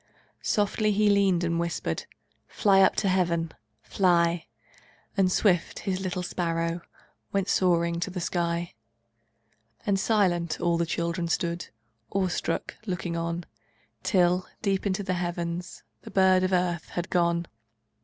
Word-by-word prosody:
Softly 210 +1 +1
He 210 0 +3
leaned 195 -3 +3
and 170 0 0
whispered: 170 - -2 0.4
"Fly 195 -2 +4
up 190 - +5
to 200 - 0
Heaven! 170 -3 +1 0.3
Fly!" 170 -3 +2 0.7
And 190 -2 +3
swift, 180 -3 +2
His 190 -2 -2
little 185 -1 -3
sparrow 170 -1 -1 0.5
Went 195 -1 0
soaring 170 -3 +2
to 180 - -2
the 185 0 -5
sky, 170 -1 -1 1.1
And 200 -2 +2
silent, 180 -6 +1
all 170 -1 +1
the 170 - +1
children 170 +1 -1
Stood, 170 +1 -1 0.4
awestruck, 185 -3 -1
looking 180 -2 -2
on, 170 +1 -2 0.6
Till, 180 -1 +2 0.2
deep 195 -1 +1
into 195 +1 -1
the 185 -1 -1
heavens, 175 0 -3 0.2
The - - -10
bird 190 -1 +4
of 185 0 +1
earth 180 -2 0
had 175 +1 -4
gone. 170 -1 +2
175 Hz, 135 wpm, -27 LUFS, 170-190 Hz, 1.1 s, up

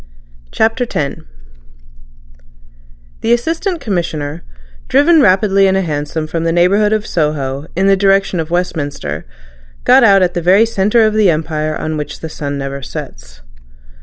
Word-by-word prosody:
CHAPTER 225 +3 0
X 140 -2 -2 2.0
The 230 - +2
Assistant 330 - -1
Commissioner, 165 - -3 0.5
driven 300 +4 +4
rapidly 195 -1 +3
in 190 - +2
a 190 - +1
hansom 150 0 -3
from 165 +1 -3
the 165 - 0
neighbourhood 195 +5 +2
of 215 -1 0
Soho 150 -3 -2
in 190 +3 +1
the 195 0 +5
direction 195 -2 +1
of 160 0 -3
Westminster, 145 - -3 0.6
got 260 +1 +5
out 195 -4 +5
at 180 - 0
the 175 - -2
very 190 +6 +4
centre 220 +1 +2
of 215 - +1
the 215 -3 +3
Empire 155 -1 -2
on 155 0 -4
which 150 - -6
the 160 - -6
sun 145 -2 -5
never 140 0 -5
sets. - - -9
175 Hz, 150 wpm, -15 LUFS, 150-210 Hz, 2.0 s, the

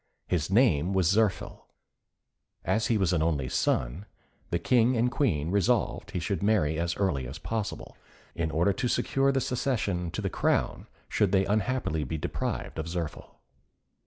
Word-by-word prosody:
His 85 -3 -1
name 95 - +3
was 95 -3 +3
Zirphil. 105 -1 0 1.0
As 110 +1 +1
he 115 - +2
was 95 -3 +1
an 80 - +1
only 75 -5 0
son, 65 +11 -1 0.4
the 85 - +1
King 120 +6 +3
and 120 +2 +2
Queen 85 - 0
resolved 100 -3 +1
he - - -3
should 100 +4 -2
marry 95 -7 +2
as 85 0 -1
early 70 -11 0
as 65 - -7
possible, 110 -3 -4 0.4
in 85 -1 -2
order 85 +5 +2
to 125 +3 -1
secure 135 +3 +1
the 135 - +1
succession 110 -10 -1
to - - -4
the - - 0
crown - - 0 0.2
should 100 -3 +1
they 95 -1 +3
unhappily 105 -6 0
be 80 +4 -3
deprived 75 - -3
of 80 - -3
Zirphil. 85 -2 -5
95 Hz, 160 wpm, -28 LUFS, 80-110 Hz, 1.0 s, name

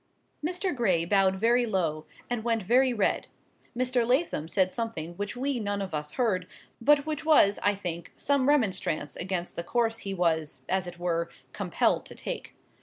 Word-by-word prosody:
Mr. 360 +1 -1
Gray 185 -9 +2
bowed 190 0 +3
very 235 +4 +3
low, 160 -7 -1 0.2
and 240 -2 -2
went 230 -2 0
very 255 +6 +4
red; 215 -5 0 0.5
Mr. 250 -1 +2
Lathom 245 - +1
said 185 +2 +1
something 200 -9 -3
which 205 +6 -5
we 270 0 -1
none 205 -2 -2
of 195 -4 -4
us 150 0 -3
heard, 190 -8 0 0.3
but 285 +3 +4
which 310 0 -3
was, 295 -10 +5
I 205 0 +2
think, 170 -3 -5
some 280 -1 +1
remonstrance 190 - +1
against 180 -1 -3
the 170 - -3
course 225 +3 0
he 195 -1 -4
was, 160 -4 0
as 190 -1 0
it 175 - -8
were, 170 -1 -1 0.2
compelled - - +1
to - - -9
take. - - -6
205 Hz, 175 wpm, -28 LUFS, 175-245 Hz, 0.5 s, was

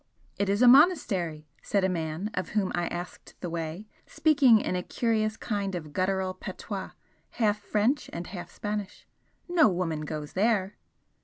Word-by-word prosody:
"It 200 -1 +1
is 200 +5 +2
a - - +7
monastery," 220 - +4
said 200 -2 0
a - - +4
man 170 +3 -3
of 185 - -3
whom 195 -3 +1
I 175 -1 0
asked 175 +1 -7
the 175 - -5
way, 165 +4 -4 0.2
speaking 275 -8 +5
in 185 - -2
a 180 - 0
curious 220 0 0
kind 200 -4 -2
of 155 -4 -7
guttural 190 0 0
patois, 185 - -6 0.4
half 210 -3 +1
French 215 +7 0
and 170 +1 -5
half 175 -2 -7
Spanish 205 -1 -5 0.4
"No 345 -6 +5
woman 175 -4 -2
goes 150 -1 -6
there." 205 -1 +1
195 Hz, 160 wpm, -28 LUFS, 175-215 Hz, 0.4 s, a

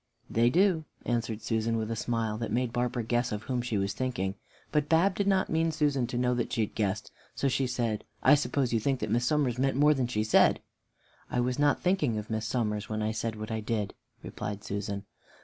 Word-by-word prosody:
"They 115 +1 +4
do," 175 +1 +3 0.2
answered 115 -2 -1
Susan, 115 0 0
with 110 0 -2
a - - -1
smile 115 -1 -1
that 115 -2 -3
made 120 +1 0
Barbara 120 -1 -1
guess 120 +2 0
of 105 0 -3
whom 125 0 -1
she 120 -3 -2
was 100 0 0
thinking. 100 -6 -2 0.4
But 150 -1 +1
Bab 170 +4 +4
did 200 +1 -1
not 195 -1 +2
mean 160 0 +2
Susan 145 -5 +1
to 120 - -4
know 125 0 +2
that 120 -1 -1
she 110 - +1
guessed, 105 0 -2 0.2
so 140 - 0
she 135 0 +1
said, 120 -4 -1 0.2
"I - - +7
suppose 140 -4 +1
you 115 - +3
think 135 +3 0
that - - -2
Miss 120 +1 +2
Somers 135 -5 +1
meant 135 0 +1
more 150 +2 +6
than 130 -4 0
she 110 -3 0
said?" 110 - +4 0.7
"I 125 - -1
was 125 +2 0
not 145 0 +3
thinking 155 - +2
of 105 +1 -5
Miss 110 0 -1
Somers 105 -4 -1
when 110 0 -2
I 110 - 0
said 110 0 -3
what 110 +1 -6
I 110 - -1
did," 105 -2 -2 0.3
replied 105 -1 -5
Susan. 100 0 -4
120 Hz, 220 wpm, -29 LUFS, 110-135 Hz, 0.7 s, I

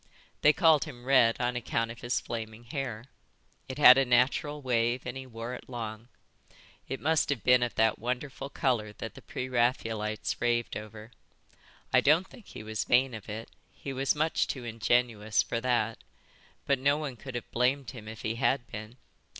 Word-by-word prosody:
They 150 - +7
called 160 -2 +4
him 125 -6 -10
Red 130 -4 +4
on 125 0 0
account 115 -1 -1
of 115 - -11
his 120 +1 0
flaming 110 0 -6
hair. 120 -3 -5 0.6
It 130 - -5
had 135 -3 +9
a - - +4
natural 135 +4 +2
wave 120 -2 0
and - - -5
he 130 0 -7
wore 115 0 -6
it 125 - -9
long. 115 -2 -6 0.8
It 135 - -3
must 160 +1 +1
have 140 -6 -1
been 125 0 +5
of 120 -1 -1
that 110 0 +2
wonderful 130 +3 -4
colour 120 -7 -1
that 115 - -7
the - - -12
pre 125 - -5
Raphaelites 115 -4 -1
raved 120 -1 0
over. 110 +1 -8 0.8
I - - +6
don't 160 +6 +4
think 230 - -16
he - - -9
was 110 0 -2
vain 125 +1 +3
of 110 -1 -8
it, 110 +2 -6 0.2
he 135 - -7
was 135 +2 +1
much 155 +2 +1
too 130 - -4
ingenuous 115 -1 +1
for 115 - -3
that, 120 -3 0 0.7
but 140 -2 +2
no 140 +2 +3
one 150 -4 -4
could 130 +1 -9
have 120 - -6
blamed 130 +3 +1
him 115 -5 -10
if 110 0 -9
he 110 +1 -2
had 130 0 +1
been. 110 +3 -8
120 Hz, 185 wpm, -29 LUFS, 115-135 Hz, 0.8 s, had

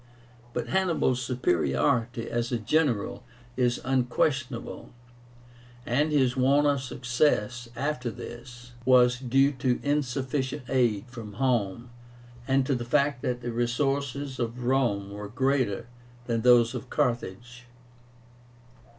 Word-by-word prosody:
But 120 -1 -3
Hannibal's 170 -9 +1
superiority 115 - 0
as 120 +1 -2
a 120 - +1
general 120 -1 0 0.3
is 125 -1 +1
unquestionable, 130 -1 -1 1.0
and 145 +6 +1
his 130 -4 +2
want 140 +3 +3
of 140 -2 +2
success 120 -2 0
after 140 -3 -2
this 120 +1 -10
was 125 0 +5
due 135 +2 +3
to 130 -2 0
insufficient 135 -1 -1
aid 120 -5 +1
from 115 -4 -9
home, 120 -2 -1 0.6
and 135 0 +2
to 140 - +1
the 120 -2 -2
fact 140 +1 +1
that 125 -1 -2
the 120 0 -3
resources 135 +3 -1
of 120 +1 -3
Rome 120 -6 +1
were 105 +1 -6
greater 130 -2 0 0.4
than 115 -2 -1
those 120 -1 +5
of 130 - -6
Carthage. 120 +1 -2
125 Hz, 115 wpm, -27 LUFS, 120-135 Hz, 1.0 s, was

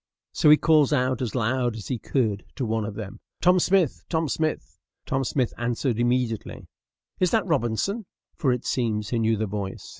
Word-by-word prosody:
So 150 - +3
he 150 - +9
calls 155 -4 +4
out 130 -3 +1
as 125 -2 -3
loud 120 0 0
as 110 - -7
he 125 -4 -2
could 110 -7 -1
to 130 - -2
one 110 -1 -1
of 105 -1 -6
them, 105 -3 -7 0.2
"Tom 180 +1 +4
Smith! 180 -5 +2
Tom 160 -1 0
Smith!" 155 +2 -2 0.3
Tom 135 0 0
Smith 130 -1 -1
answered 120 0 -1
immediately, 120 -2 -1 0.5
"Is 185 - +3
that 220 +1 +1
Robinson?" 165 - -1 0.3
for 135 - +1
it 125 -1 -2
seems 110 -4 -1
he 120 - 0
knew 110 0 +2
the 110 - -1
voice. 100 -1 -5
125 Hz, 185 wpm, -25 LUFS, 110-150 Hz, 0.5 s, he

